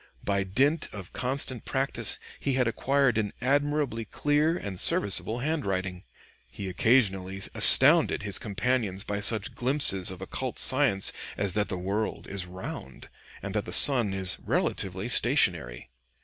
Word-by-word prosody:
By 100 -1 -2
dint 135 - -1
of 100 -4 -11
constant 130 -1 -2
practice 135 +1 0 0.2
he 140 - -3
had 130 -2 0
acquired 130 +1 0
an 105 -2 -4
admirably 140 -2 -2
clear 150 +7 -1
and 95 - -8
serviceable 105 +5 +2
handwriting. 95 - -4 0.4
He 95 +10 -8
occasionally 95 -2 0
astounded - - +5
his 100 -3 +3
companions 105 -2 -3
by 100 -1 -5
such 105 0 +2
glimpses 125 -8 0
of 95 -1 -8
occult 120 +6 -6
science 130 -8 +5 0.2
as 100 -3 -3
that 105 +1 -2
the 90 - -4
world 100 +4 -4
is 95 -2 -1
round 90 -7 -10 0.3
and - - -6
that - - -3
the - - -9
sun 125 -8 +6
is 95 -2 -1
relatively 95 +3 -3
stationary. 90 - 0
105 Hz, 140 wpm, -26 LUFS, 95-130 Hz, 0.4 s, sun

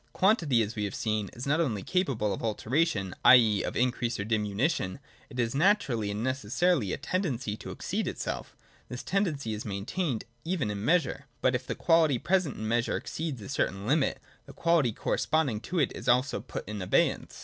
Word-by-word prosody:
Quantity, 165 - +3
as 105 +2 -5
we 105 - -2
have 100 - -4
seen, 110 -3 -1
is 120 - -6
not 145 +3 +2
only 110 - -1
capable 135 - 0
of - - -5
alteration, 110 - 0
i. - - +10
e. 110 -5 +4
of - - -4
increase 120 -2 0
or - - -1
diminution: 105 - 0 0.3
it 125 -3 -8
is 115 -1 +1
naturally 140 - +2
and 105 +2 -3
necessarily 130 - +1
a - - -1
tendency 135 - -2
to - - -9
exceed - - -3
itself. - - -4 0.3
This 125 - -6
tendency 155 - -1
is 105 - -5
maintained 110 - -2
" 120 - -38
even 140 - -1
in 100 0 -4
measure. 150 -1 +1 0.2
'■'But 130 - +4
if 125 +1 -2
the - - -2
quantity 165 -5 +3
present 180 0 +1
in 110 - -4
measure 120 +1 +1
exceeds 150 -9 -5
"a - - -8
certain 100 -7 -1
limit, 140 +4 +1 0.3
the - - -11
quality 165 -7 +2
corresponding 140 0 0
to 180 +10 -5
it 145 -6 +2
is 120 - -3
also 125 +2 +3
put - - -7
in 105 -1 -5
abeyance. 90 - +1
125 Hz, 195 wpm, -29 LUFS, 105-155 Hz, 0.3 s, i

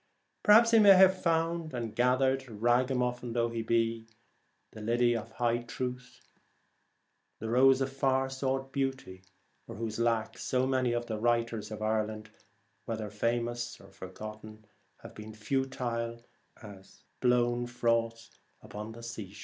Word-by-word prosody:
Perhaps 230 +2 +6
he 225 - +6
may 200 -2 +8
have 190 0 +5
found 165 -2 0
and 115 -3 -4
gathered, 130 +2 +2
ragamuffin 125 +2 0
though 120 0 +1
he 115 0 -3
be, 115 0 0 0.6
the 110 - -10
Lily 120 +2 +2
of 115 0 -5
High 120 -1 0
Truth, 125 +1 -6 1.2
the 110 0 -5
Rose 130 +2 +5
of 135 0 -2
Far 135 -1 +1
sought 135 0 -3
Beauty, 135 -9 -3 0.5
for - - -8
whose 110 +1 -4
lack 115 -2 0
so 130 0 0
many 130 -2 +1
of 120 0 -2
the 110 -2 -4
writers 115 -2 0
of 110 0 -6
Ireland, 110 0 -2 0.5
whether 110 -2 -4
famous 120 +2 -2
or - - -16
forgotten, 110 +3 -10 0.4
have - - -10
been 110 0 -10
futile 115 -1 -3 0.4
as 100 -3 -14 0.2
the - - 0
blown 120 0 +2
froth 115 -1 -1 0.3
upon 105 +1 -8
the 115 +1 -11
shore. 110 -4 -7
120 Hz, 140 wpm, -30 LUFS, 110-130 Hz, 1.2 s, may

